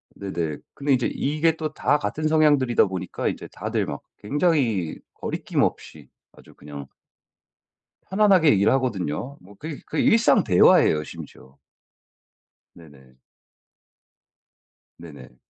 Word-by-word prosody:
네네. 85 -6 -4 0.2
근데 140 0 -2
인제 125 -2 +1
이게 155 +3 0
또 155 -1 -5
다 150 - +1
같은 155 +1 -3
성향들이다 145 -6 +3
보니까 95 -2 -4
인제 - - -4
다들 - - -3
막 - - -6 0.2
굉장히 125 - 0 0.2
거리낌 - - -3
없이 - - -4 0.3
아주 - - -18
그냥 70 -1 -10 1.2
편안하게 190 -6 +4
얘기를 100 0 +3
하거든요. 125 - -2
뭐 100 +3 -17
그게 150 +6 -8
그게 - - -1
일상 230 +1 +4
대화예요 85 -4 +4
심지어. 65 -2 -12 1.2
네네. 70 -6 -18 1.8
네네. 80 -6 -13
120 Hz, 255 characters per minute, -23 LUFS, -, 1.8 s, 편안하게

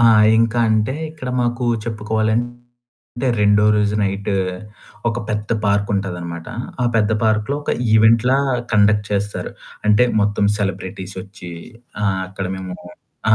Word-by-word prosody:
ఆ! - - +3 0.3
ఇంకాంటే 115 0 +2 0.2
ఇక్కడ 155 -5 -8
మాకు 120 0 -1 0.2
చెప్పుకోవాలంటే 120 +3 -3
రెండో 105 0 +4
రోజు 105 0 +1
నైట్ 100 +1 -1 0.8
ఒక 115 0 -2
పెద్ద 105 -1 -2 0.2
పార్కుంటదన్నమాట. 100 -5 -1 0.4
ఆ - - +2
పెద్ద 110 -1 +2
పార్కు‌లో 110 +5 +1
ఒక - - -2 0.2
ఈవెంట్‌లా 115 +4 +5 0.4
కండక్ట్ 105 0 +4
చేస్తారు. 100 0 -2 0.4
అంటే 105 +3 +5 0.2
మొత్తం 105 0 +1
సెలబ్రిటీసొచ్చి, 95 -1 -5 0.5
ఆ! - - +1 0.2
అక్కడ 95 0 -5
మేము 95 -1 -6 0.6
ఆ! - - +8
105 Hz, 110 wpm, -20 LUFS, 100-115 Hz, 0.8 s, ఆ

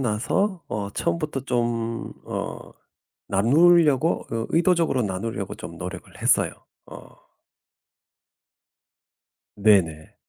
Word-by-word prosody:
나서 145 - 0
어 100 -1 -3
처음부터 155 -3 -2
좀 115 -2 -2
어 - - -6 0.6
나누려고 150 - +4
의 115 0 -2
의도적으로 165 -6 +2
나누려고 100 0 -4
좀 85 - -9
노력을 90 +1 -7
했어요. - - +3 0.4
어. - - -13 2.3
네네. 95 -7 +2
120 Hz, 190 characters per minute, -24 LUFS, 100-160 Hz, 2.3 s, 나누려고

